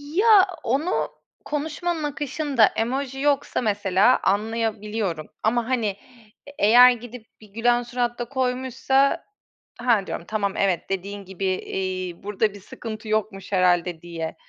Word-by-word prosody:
Ya, 415 Hz, -1 st, +6 dB, 0.2 s
onu 280 Hz, +9 st, 0 dB, 0.4 s
konuşmanın 315 Hz, +2 st, -2 dB
akışında 290 Hz, -4 st, +1 dB
emoji 265 Hz, +5 st, -2 dB
yoksa, 285 Hz, -2 st, +1 dB
mesela, 205 Hz, +1 st, +3 dB
anlayabiliyorum. 210 Hz, -4 st, -1 dB, 0.2 s
Ama, 235 Hz, +2 st, +1 dB
hani, 235 Hz, -5 st, +1 dB, 0.6 s
e -, -, -9 dB
eğer 245 Hz, +4 st, +8 dB
gidip 245 Hz, -1 st, -7 dB, 0.2 s
bir 215 Hz, -, -14 dB
gülen 240 Hz, +3 st, +1 dB
surat 240 Hz, 0 st, -2 dB
da 240 Hz, -, -2 dB
koymuşsa, 260 Hz, +4 st, 0 dB, 0.6 s
"Ha!" 230 Hz, -6 st, +2 dB
diyorum, 170 Hz, -, -5 dB
"Tamam, 200 Hz, -2 st, -1 dB
evet, 190 Hz, -3 st, 0 dB
dediğin 195 Hz, +1 st, -4 dB
gibi, 190 Hz, +1 st, -5 dB
eee, 185 Hz, -1 st, -3 dB
burada 210 Hz, +1 st, 0 dB
bir 205 Hz, -, -11 dB
sıkıntı 215 Hz, +1 st, -8 dB
yokmuş 210 Hz, -3 st, -2 dB
herhâlde." 180 Hz, -3 st, +2 dB
diye. 165 Hz, -2 st, -5 dB
225 Hz, 130 wpm, -24 LUFS, 195-260 Hz, 0.6 s, eğer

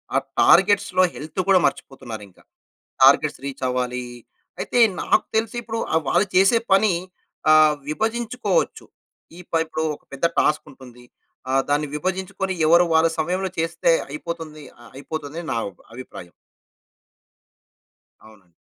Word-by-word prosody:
ఆ -, -, +5 dB, 0.2 s
టార్గెట్స్‌లో 190 Hz, -2 st, +4 dB
హెల్త్ 155 Hz, +5 st, -7 dB
కూడా 190 Hz, -2 st, +5 dB
మర్చిపోతున్నారు 120 Hz, -6 st, -4 dB
ఇంకా. -, -, -24 dB, 0.6 s
టార్గెట్స్ -, -, +5 dB
రీచ్ 140 Hz, -1 st, -7 dB
అవ్వాలి. 125 Hz, 0 st, -2 dB, 0.6 s
అయితే -, -, -1 dB, 0.2 s
నాకు -, -, +2 dB
తెలిసి 225 Hz, +1 st, -1 dB
ఇప్పుడు 225 Hz, 0 st, -5 dB
ఆహ్, 160 Hz, -, +2 dB
వాళ్ళు 205 Hz, -, +2 dB
చేసే 195 Hz, +5 st, +5 dB
పని 195 Hz, 0 st, +4 dB, 0.6 s
ఆహ్, 155 Hz, -1 st, +6 dB
విభజించుకోవచ్చు. 235 Hz, -, -1 dB, 0.5 s
ఈ -, -, -10 dB
పై 165 Hz, -, +2 dB
ఇప్పుడు, 160 Hz, 0 st, -3 dB
ఒక -, -, -29 dB
పెద్ద 140 Hz, +4 st, -4 dB
టాస్క్ 150 Hz, -, +2 dB
ఉంటుంది. 125 Hz, -2 st, -15 dB, 0.5 s
ఆ -, -, 0 dB, 0.2 s
దాన్ని 145 Hz, +1 st, +1 dB
విభజించుకొని 190 Hz, +3 st, -3 dB
ఎవరు 170 Hz, +2 st, +6 dB
వాళ్ళ 160 Hz, +1 st, +5 dB
సమయంలో 185 Hz, +4 st, -1 dB
చేస్తే 165 Hz, +1 st, 0 dB, 0.2 s
అయిపోతుంది 155 Hz, 0 st, -7 dB, 0.2 s
ఆహ్, 120 Hz, -, -15 dB
అయిపోతుంది 150 Hz, +1 st, -6 dB
అని 160 Hz, -, -10 dB
నా -, -, -1 dB, 0.4 s
అభిప్రాయం. 105 Hz, -8 st, -10 dB, 2.0 s
అవునండి. 100 Hz, -6 st, -21 dB
160 Hz, 130 wpm, -22 LUFS, 140-190 Hz, 2.0 s, ఆహ్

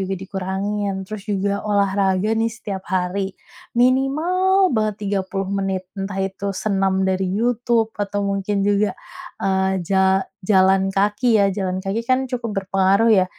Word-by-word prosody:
juga 190 Hz, 0 st, -2 dB
dikurangin, 195 Hz, +1 st, -3 dB
terus 215 Hz, +1 st, -7 dB
juga 200 Hz, 0 st, 0 dB
olahraga 200 Hz, 0 st, +1 dB
nih 230 Hz, -, +2 dB
setiap 200 Hz, -3 st, -5 dB
hari, 190 Hz, +1 st, -1 dB, 0.4 s
minimal 330 Hz, +9 st, +3 dB
banget 215 Hz, -2 st, +1 dB
30 195 Hz, -1 st, -2 dB
menit, 195 Hz, -1 st, -1 dB
entah 195 Hz, -1 st, -5 dB
itu 195 Hz, +1 st, -5 dB, 0.2 s
senam 195 Hz, -2 st, +1 dB
dari 190 Hz, 0 st, 0 dB
YouTube, 235 Hz, -1 st, +1 dB
atau 205 Hz, 0 st, -1 dB
mungkin 200 Hz, 0 st, -1 dB
juga, 205 Hz, -1 st, +1 dB, 0.5 s
eee, 190 Hz, 0 st, +1 dB
ja 190 Hz, 0 st, +3 dB, 0.2 s
jalan 190 Hz, -1 st, +4 dB
kaki 210 Hz, +4 st, +2 dB
ya, 200 Hz, -, +4 dB
jalan 185 Hz, -1 st, -2 dB
kaki 195 Hz, +4 st, -1 dB
kan 255 Hz, +1 st, +3 dB
cukup 245 Hz, -3 st, -4 dB
berpengaruh 195 Hz, +3 st, +3 dB
ya 190 Hz, -3 st, +5 dB
200 Hz, 140 wpm, -21 LUFS, 190-215 Hz, 0.5 s, ya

